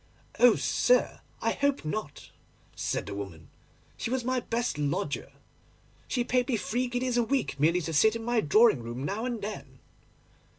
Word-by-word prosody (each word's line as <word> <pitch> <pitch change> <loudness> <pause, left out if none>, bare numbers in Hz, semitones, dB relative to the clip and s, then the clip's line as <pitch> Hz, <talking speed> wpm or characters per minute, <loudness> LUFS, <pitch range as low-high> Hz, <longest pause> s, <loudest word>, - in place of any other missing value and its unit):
"Oh 245 -2 +7
sir, - - +2 0.2
I - - +2
hope 280 - 0
not!" 155 -2 -5 0.4
said - - -2
the - - -6
woman; 95 -6 -8 0.5
"she - - -3
was 255 -1 -1
my 255 0 +1
best 235 -7 -2
lodger. 145 0 -2 0.8
She 245 - 0
paid 250 0 +1
me 245 - +1
three 245 +4 -1
guineas 245 0 -1
a 240 - +4
week 245 - -1
merely 170 +5 +3
to 165 0 -4
sit 220 +9 +4
in 230 - -5
my 240 -1 +1
drawing 215 - +4
rooms 120 +4 -5
now 210 +8 -2
and 235 -4 -3
then." 210 +1 -7
225 Hz, 170 wpm, -28 LUFS, 150-245 Hz, 0.8 s, Oh